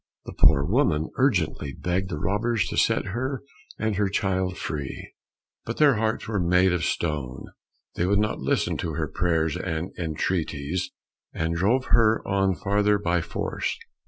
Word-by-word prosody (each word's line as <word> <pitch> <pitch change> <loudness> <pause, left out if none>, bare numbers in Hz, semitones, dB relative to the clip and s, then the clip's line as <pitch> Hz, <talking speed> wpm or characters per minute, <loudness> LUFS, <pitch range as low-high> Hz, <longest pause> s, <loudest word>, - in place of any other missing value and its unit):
The - - -7
poor 70 - +5
woman 85 - +1
urgently 90 - +1
begged 95 +4 -2
the 75 - -3
robbers 105 +6 0
to - - -4
set - - +2
her 130 +3 -3 0.3
and 110 -2 -1
her 100 -1 +2
child 95 -2 0
free, 70 -3 -5 0.5
but 115 - -5
their 145 -6 +5
hearts 110 +1 -1
were 105 -3 -1
made 90 +1 +3
of 90 - -1
stone, 70 -6 -2 0.5
they 90 - 0
would 100 +1 +3
not 105 +1 0
listen - - 0
to - - -3
her - - -1
prayers 80 -3 0
and 90 0 -3
entreaties, 85 +1 -2 0.4
and 80 +1 -1
drove 115 +10 +2
her 115 -1 +4
on 95 -1 +2
farther 105 +2 +2
by 90 -3 0
force. - - -3
95 Hz, 160 wpm, -25 LUFS, 80-105 Hz, 0.5 s, poor